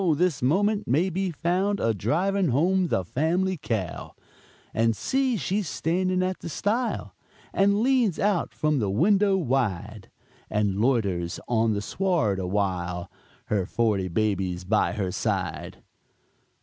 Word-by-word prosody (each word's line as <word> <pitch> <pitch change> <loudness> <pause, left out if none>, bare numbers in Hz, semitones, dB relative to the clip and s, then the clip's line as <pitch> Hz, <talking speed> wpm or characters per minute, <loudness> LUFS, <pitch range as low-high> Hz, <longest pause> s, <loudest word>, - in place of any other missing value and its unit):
this 175 -2 +1
moment 205 +10 +1
may 165 +9 +2
be 190 +2 -1
found 180 +5 0
A 115 - +1
driving 180 - 0
home 175 +8 +2
the 95 - 0
family 175 - 0
cow; 110 - -4 0.6
"And 115 -1 +1
see, 260 - 0
she's 195 -1 -1
standing 185 +3 0
at 185 0 -2
the - - -7
stile, 225 - -1 0.4
And 200 +2 +3
leans 245 -7 +3
from - - -1
out 155 -6 0
the 105 -4 0
window 195 - +3
wide, 110 - -2 0.4
And 105 -1 0
loiters 100 -9 0
on 115 -2 +2
the 100 - -3
sward 165 - 0
a 90 - -3
while, 90 -3 -2 0.3
Her 100 -3 -1
forty 110 -4 0
babies 95 -2 -1
by 90 - +1
her 100 -4 -2
side." - - -3
140 Hz, 135 wpm, -26 LUFS, -, 0.6 s, And